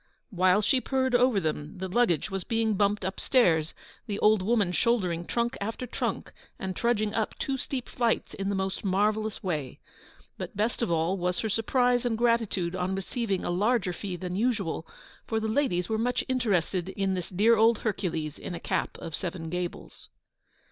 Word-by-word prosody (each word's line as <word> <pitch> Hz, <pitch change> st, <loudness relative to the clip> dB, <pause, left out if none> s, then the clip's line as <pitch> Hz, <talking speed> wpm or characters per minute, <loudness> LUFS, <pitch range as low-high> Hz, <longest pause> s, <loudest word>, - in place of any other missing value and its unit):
While 185 Hz, +2 st, +3 dB
she 255 Hz, +5 st, +3 dB
purred 260 Hz, -1 st, 0 dB
over 245 Hz, -3 st, +4 dB
them, 155 Hz, -2 st, -3 dB
the 190 Hz, +1 st, -3 dB
luggage 200 Hz, -, +1 dB
was 195 Hz, -1 st, -2 dB
being 225 Hz, +1 st, +1 dB
bumped 205 Hz, +1 st, +1 dB
upstairs, 180 Hz, -4 st, +2 dB, 0.3 s
the 205 Hz, -2 st, -2 dB
old 210 Hz, -1 st, +4 dB
woman 205 Hz, -2 st, +2 dB
shouldering 180 Hz, -6 st, +1 dB
trunk 235 Hz, +1 st, 0 dB
after 225 Hz, +5 st, -3 dB
trunk, 245 Hz, -, -3 dB, 0.3 s
and 190 Hz, -1 st, -4 dB
trudging 215 Hz, -3 st, +1 dB
up 220 Hz, -2 st, -1 dB
two 270 Hz, -, -1 dB
steep 260 Hz, -1 st, -4 dB
flights 235 Hz, -2 st, 0 dB
in 195 Hz, 0 st, -3 dB
the 200 Hz, -, 0 dB
most 190 Hz, 0 st, -2 dB
marvellous 210 Hz, +2 st, 0 dB
way. 150 Hz, -9 st, -3 dB, 0.6 s
But -, -, -6 dB
best 220 Hz, +4 st, 0 dB
of 235 Hz, -, 0 dB
all 170 Hz, +3 st, +1 dB
was 180 Hz, 0 st, 0 dB
her 220 Hz, -, -2 dB
surprise 245 Hz, +3 st, +2 dB
and 235 Hz, -2 st, 0 dB
gratitude 225 Hz, -7 st, +1 dB
on 185 Hz, +1 st, -1 dB
receiving 195 Hz, 0 st, -2 dB
a -, -, 0 dB
larger 200 Hz, 0 st, +1 dB
fee 185 Hz, +1 st, -5 dB
than 180 Hz, 0 st, -4 dB
usual, 200 Hz, -7 st, -1 dB, 0.4 s
for 225 Hz, -, 0 dB
the 220 Hz, -, -2 dB
ladies 215 Hz, -8 st, +1 dB
were 220 Hz, 0 st, -1 dB
much 245 Hz, +2 st, +1 dB
interested 195 Hz, -8 st, 0 dB
in 195 Hz, 0 st, -1 dB
this 180 Hz, -2 st, -3 dB
dear 210 Hz, +5 st, +4 dB
old 225 Hz, +1 st, +5 dB
Hercules 165 Hz, -7 st, -2 dB
in 175 Hz, -, -5 dB
a -, -, -5 dB
cap -, -, -2 dB
of 165 Hz, -, -7 dB
seven 165 Hz, -1 st, -4 dB
gables. 180 Hz, -1 st, -5 dB
200 Hz, 180 wpm, -28 LUFS, 180-230 Hz, 0.6 s, old